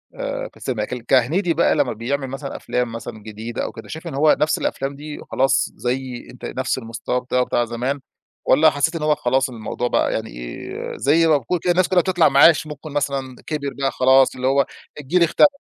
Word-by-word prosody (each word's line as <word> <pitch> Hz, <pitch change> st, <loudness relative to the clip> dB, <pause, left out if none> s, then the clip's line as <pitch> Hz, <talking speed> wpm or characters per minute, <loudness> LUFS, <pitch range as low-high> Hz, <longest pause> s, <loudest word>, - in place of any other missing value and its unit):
آآ، -, -, -4 dB
في -, -, -22 dB
السينما. 110 Hz, -5 st, -2 dB
ك -, -, -7 dB
كهنيدي 165 Hz, +8 st, +3 dB
بقى -, -, +3 dB
لما 140 Hz, -6 st, +1 dB
بيعمل 135 Hz, +5 st, -2 dB
مثلًا 135 Hz, +1 st, -6 dB
أفلام 125 Hz, -2 st, -2 dB
مثلًا 115 Hz, -2 st, -8 dB
جديدة 110 Hz, +2 st, -5 dB
أو -, -, -4 dB
كده، 115 Hz, -2 st, -11 dB
شايف 160 Hz, +7 st, -7 dB
إن 155 Hz, -, -5 dB
هو 150 Hz, +2 st, +4 dB
نفس 155 Hz, +1 st, +2 dB
الأفلام 135 Hz, +1 st, -2 dB
دي 150 Hz, +1 st, -8 dB
خلاص 135 Hz, +1 st, +2 dB
زي 125 Hz, 0 st, -3 dB
أنت 125 Hz, -, -10 dB
نفس 130 Hz, 0 st, -2 dB
المستوى 115 Hz, +1 st, -3 dB
بتاعه 125 Hz, 0 st, +1 dB
بتاع 120 Hz, -, +1 dB
زمان؟ 125 Hz, +5 st, -2 dB, 0.5 s
والّا 155 Hz, +1 st, +6 dB
حسيت 155 Hz, +3 st, 0 dB
إن 160 Hz, -, -3 dB
هو 150 Hz, 0 st, +3 dB
خلاص 130 Hz, +1 st, +1 dB
الموضوع 120 Hz, +1 st, -4 dB
بقى -, -, +1 dB
يعني 110 Hz, 0 st, -3 dB
إيه، -, -, -7 dB
زي 160 Hz, +4 st, +3 dB
ما 155 Hz, -2 st, +5 dB
بيكون 165 Hz, +7 st, -2 dB
الناس 175 Hz, +1 st, +3 dB
كلها 185 Hz, -2 st, +4 dB
بتطلع 175 Hz, -4 st, +3 dB
معاش، 155 Hz, +3 st, +6 dB
ممكن 150 Hz, 0 st, -8 dB
مثلًا 135 Hz, -3 st, -2 dB
كبِر 140 Hz, -3 st, -3 dB
بقى 135 Hz, -1 st, +1 dB
خلاص 130 Hz, +1 st, +4 dB
اللي 130 Hz, 0 st, -1 dB
هو 140 Hz, +1 st, +3 dB, 0.3 s
الجيل 170 Hz, +5 st, +2 dB
اختلف؟ 285 Hz, -, +5 dB
135 Hz, 205 wpm, -21 LUFS, 125-155 Hz, 0.5 s, والّا